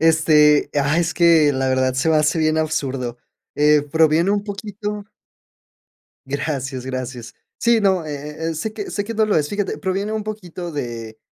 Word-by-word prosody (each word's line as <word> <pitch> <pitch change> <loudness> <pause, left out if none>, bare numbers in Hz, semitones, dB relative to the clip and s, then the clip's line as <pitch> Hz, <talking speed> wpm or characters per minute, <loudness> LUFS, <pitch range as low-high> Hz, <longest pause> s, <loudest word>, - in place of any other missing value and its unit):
Este, 155 -2 +4
ah, 145 +3 +2
es 175 -1 0
que 165 -4 +5
la 130 0 -1
verdad 130 0 +1
se 135 +5 0
me 160 - +4
hace 155 +2 +2
bien 155 0 +2
absurdo, 135 -6 -2 0.4
eh, 150 0 +4
proviene 160 +4 +2
un 205 0 0
poquito 210 0 -5 1.2
Gracias, 135 -2 -3
gracias. 130 -2 -6 0.3
Sí, 235 -2 +3
no, 190 -5 +2
eh 150 +2 -5
eh, - - -4
sé 215 +8 -3
que 210 -2 -6
sé 205 - -2
que 230 - -5
no 220 0 +2
lo 210 - +1
es. 150 -1 0
Fíjate, 205 -1 -2
proviene 195 +3 -2
un 215 -1 -2
poquito 180 -5 -6
de 115 -6 -6
155 Hz, 175 wpm, -20 LUFS, 140-195 Hz, 1.2 s, que